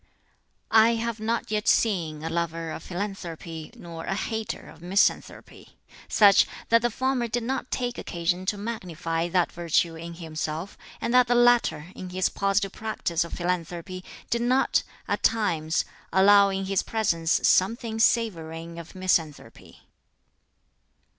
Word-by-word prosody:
"I 225 +1 +6
have 230 -1 -3
not 225 0 -2
yet 210 -1 -1
seen 165 -8 +1
a 160 - -2
lover 165 -1 -2
of - - -6
philanthropy, 175 -4 -6
nor 165 -1 -8
a 195 - -1
hater 220 +1 -4
of 160 - -14
misanthropy 185 +3 -1 0.3
such, 205 -2 +6 0.2
that 230 0 +5
the 240 - +1
former 260 +1 -1
did 235 +1 -2
not 255 +1 -3
take 245 -1 -2
occasion 175 +2 -2
to 205 - 0
magnify 175 -6 -3
that 175 0 +1
virtue 170 -1 +1
in 170 +1 -8
himself, 160 +1 -5 0.2
and 235 - -2
that 250 -1 +6
the 245 - +2
latter, 240 -9 +3
in 185 - -7
his 185 0 0
positive 195 0 0
practice 215 -7 -2
of 170 - -10
philanthropy, 180 +1 -3 0.3
did 235 - +1
not, 255 +2 +2 0.3
at - - -1
times, 165 -8 +1 0.3
allow 200 +2 +6
in 195 0 -2
his 195 -1 +1
presence 170 -7 +1
something 225 +3 +2
savoring 170 -8 0
of 170 +2 -11
misanthropy. 175 -5 -2
185 Hz, 140 wpm, -26 LUFS, 170-225 Hz, 0.3 s, I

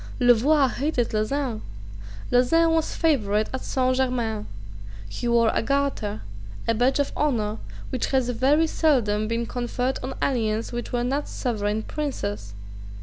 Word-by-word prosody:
Louvois 260 +4 +5
hated 260 -1 -1
Lauzun. 225 +2 -1 0.7
Lauzun 325 +7 +4
was 325 -1 0
favourite 215 -10 +2
at 260 - -3
Saint 255 -1 +1
Germains. 235 -5 -1 0.6
He 105 - -4
wore 235 -1 +4
the - - 0
garter, 275 -5 -1 0.4
a 230 - +3
badge 245 +4 +2
of 285 -1 0
honour 225 -7 0 0.3
which 260 - -1
has 260 -2 +1
very 275 +6 +3
seldom 235 -10 +1
been 230 +1 -1
conferred 245 +2 -2
on 260 +1 -5
aliens 225 -4 0
who 240 0 -2
were 240 -1 0
not 275 +4 -1
sovereign 215 -3 -2
princes. 105 - -4
245 Hz, 140 wpm, -25 LUFS, 220-275 Hz, 0.7 s, Louvois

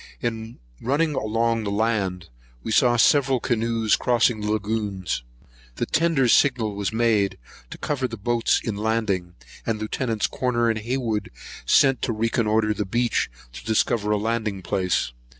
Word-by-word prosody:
In 115 -1 -4 0.2
running 150 +5 +1
along 115 -1 0
the 100 - -2
land, 100 -5 -1 0.3
we - - -4
saw 120 +2 +4
several 135 +1 +4
canoes 115 -2 +1
crossing 120 -2 +2
the 105 0 -1
lagoons. 100 - -2 0.5
The - - -1
tender's 155 -7 +2
signal 120 -6 +2
was 100 -1 -2
made, 110 -3 +1 0.3
to - - -8
cover 135 -3 -2
the 115 -1 -7
boats 115 +3 +1
in 110 - -3
landing, 105 -5 -1 0.3
and 110 -1 -2
Lieuts. 110 0 -1
Corner 120 -2 0
and 110 - -3
Hayward 115 -2 -2 0.4
sent 135 -2 +4
to 115 - -1
reconnoitre 110 -1 +1
the 105 - -2
beach, 120 +5 0 0.2
to - - -9
discover 110 -1 +1
a 105 - +2
landing 110 -3 -2
place. 90 -7 0
110 Hz, 150 wpm, -24 LUFS, 105-120 Hz, 0.5 s, saw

